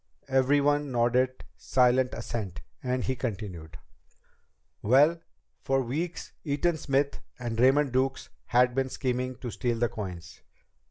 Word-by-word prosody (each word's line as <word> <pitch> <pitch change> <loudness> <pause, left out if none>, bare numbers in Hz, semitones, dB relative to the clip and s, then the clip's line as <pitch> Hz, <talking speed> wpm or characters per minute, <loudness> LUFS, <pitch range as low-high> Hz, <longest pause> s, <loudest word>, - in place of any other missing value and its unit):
Everyone 140 +2 +2
nodded 125 +2 +1
silent 125 0 +2
assent, 110 -5 -5 0.2
and 125 0 -1
he 130 - -1
continued: 95 -10 -5 1.0
"Well, 145 +9 +4 0.4
for 135 0 +1
weeks 160 +8 -4
Eaton 155 +3 0
Smith 140 -1 0 0.2
and 120 -2 -4
Raymond 135 +2 +4
Duke 130 +1 +1 0.3
had 125 0 +4
been 135 +1 0
scheming 130 0 -2
to 120 0 -6
steal 120 -1 -1
the 120 0 +1
coins. 90 -6 -7
130 Hz, 120 wpm, -28 LUFS, 120-135 Hz, 1.0 s, Well